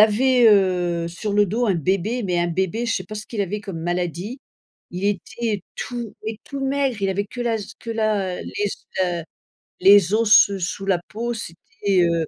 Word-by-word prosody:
avait, 240 Hz, +3 st, +5 dB
heu, 180 Hz, -4 st, +2 dB
sur 200 Hz, +5 st, -4 dB
le 205 Hz, 0 st, +4 dB
dos 225 Hz, +6 st, 0 dB
un 195 Hz, -, +2 dB
bébé, 195 Hz, -, 0 dB
mais 180 Hz, -4 st, 0 dB
un 175 Hz, 0 st, +1 dB
bébé, 190 Hz, +6 st, -1 dB
je 230 Hz, -, 0 dB
sais -, -, -4 dB
pas 215 Hz, -, -8 dB
ce 215 Hz, 0 st, -6 dB
qu'il 225 Hz, -, -4 dB
avait 200 Hz, +2 st, -2 dB
comme 195 Hz, -5 st, -6 dB
maladie. 175 Hz, -, -3 dB, 0.5 s
Il 180 Hz, +2 st, -5 dB
était 205 Hz, +1 st, -2 dB
tout 240 Hz, -3 st, -5 dB
et 220 Hz, -1 st, -4 dB
tout 280 Hz, -, -6 dB
maigre, 270 Hz, -4 st, 0 dB
il 195 Hz, -, +1 dB
avait 195 Hz, +2 st, 0 dB
que 245 Hz, +4 st, -9 dB
la 235 Hz, -2 st, +1 dB
z 210 Hz, 0 st, -7 dB
que -, -, -11 dB
la, 215 Hz, -5 st, 0 dB
heu, -, -, -6 dB
les 205 Hz, -, -2 dB
os, 200 Hz, -, -7 dB, 0.2 s
heu, 175 Hz, -2 st, -2 dB, 0.6 s
les 195 Hz, -1 st, +6 dB
os 220 Hz, 0 st, +2 dB
ce 200 Hz, -2 st, +7 dB
sous 185 Hz, +2 st, -3 dB
la 190 Hz, -3 st, +2 dB
peau, 235 Hz, +2 st, -3 dB
c'était, 200 Hz, -1 st, -2 dB
heu, 170 Hz, -2 st, +1 dB
205 Hz, 210 wpm, -22 LUFS, 180-225 Hz, 0.6 s, ce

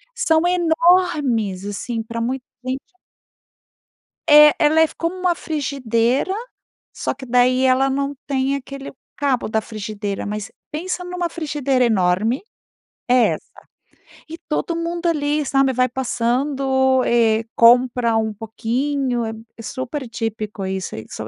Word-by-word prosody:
são 325 Hz, -9 st, +2 dB
enormes, 320 Hz, -, +2 dB
assim, 225 Hz, +3 st, -4 dB
pra 230 Hz, +1 st, -5 dB
muita 250 Hz, +2 st, -3 dB, 0.2 s
gente. 260 Hz, +8 st, -6 dB, 1.3 s
É. 300 Hz, 0 st, +9 dB
Ela 315 Hz, +2 st, +4 dB
é -, -, +7 dB
f 320 Hz, -, -4 dB
como 335 Hz, +2 st, -2 dB
uma 365 Hz, -1 st, +1 dB
frigideira, 275 Hz, -, -1 dB, 0.6 s
só -, -, -2 dB
que 265 Hz, 0 st, -10 dB
daí, 250 Hz, +1 st, +3 dB
ela 260 Hz, +1 st, +3 dB
não 280 Hz, +1 st, -2 dB
tem 270 Hz, 0 st, 0 dB
aquele 275 Hz, 0 st, -7 dB, 0.3 s
cabo 275 Hz, -4 st, 0 dB
da 220 Hz, 0 st, 0 dB
frigideira, 210 Hz, -2 st, -5 dB
mas 210 Hz, 0 st, -5 dB, 0.2 s
pensa 360 Hz, +4 st, -3 dB
numa 355 Hz, -1 st, -3 dB
frigideira 285 Hz, -6 st, 0 dB
enorme. 210 Hz, +3 st, +1 dB, 0.7 s
É 250 Hz, -1 st, +5 dB
essa. -, -, -12 dB, 0.8 s
E 325 Hz, +1 st, -8 dB
todo 330 Hz, +2 st, -1 dB
mundo 340 Hz, +1 st, -3 dB
ali, 300 Hz, -2 st, 0 dB
sabe 270 Hz, 0 st, +2 dB
vai 255 Hz, 0 st, +2 dB
passando, 265 Hz, +1 st, +1 dB
eh, 225 Hz, -2 st, +3 dB
compra 240 Hz, -1 st, +4 dB
um 220 Hz, -1 st, -1 dB
pouquinho. 240 Hz, +4 st, -2 dB
É 220 Hz, -, -3 dB, 0.3 s
é -, -, -9 dB
super 260 Hz, +3 st, -5 dB
típico 215 Hz, -3 st, -4 dB
isso 190 Hz, -1 st, -4 dB
aí 110 Hz, -, -7 dB
só -, -, -6 dB
260 Hz, 135 wpm, -20 LUFS, 230-295 Hz, 1.3 s, É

